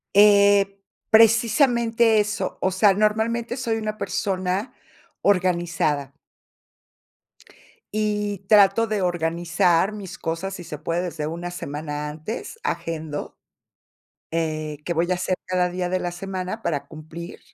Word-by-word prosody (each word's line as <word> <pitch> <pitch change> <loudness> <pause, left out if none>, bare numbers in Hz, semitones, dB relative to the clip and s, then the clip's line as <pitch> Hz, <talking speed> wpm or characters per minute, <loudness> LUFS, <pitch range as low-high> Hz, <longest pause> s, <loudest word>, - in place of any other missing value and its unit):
Eh, 200 -1 +5 0.3
precisamente 230 0 +4
eso, 210 -2 -2
o 190 - +2
sea, 195 +2 +4
normalmente 225 +4 0
soy 230 -3 -1
una 215 -1 -3
persona 190 +4 -2 0.5
organizada. 170 -7 +1 1.8
Y 210 -2 -1
trato 210 +2 +5
de 210 -3 -1
organizar 175 +1 +1
mis 205 -4 -8
cosas, 170 +4 -3
si 175 - -8
se 150 -3 -7
puede, 170 +3 -2
desde 160 -4 -4
una 170 +2 -5
semana 150 -2 -5
antes, 160 - -7
agendo, 160 -3 -4 0.9
eh, 155 -2 -2
qué 170 - -1
voy 170 +2 0
a - - +3
hacer 185 +1 -1
cada 180 -1 +1
día 180 0 -2
de 185 - +1
la 175 -1 -3
semana 185 +3 -5
para 145 -8 -2
cumplir. 160 +2 -9
185 Hz, 125 wpm, -23 LUFS, 165-210 Hz, 1.8 s, Eh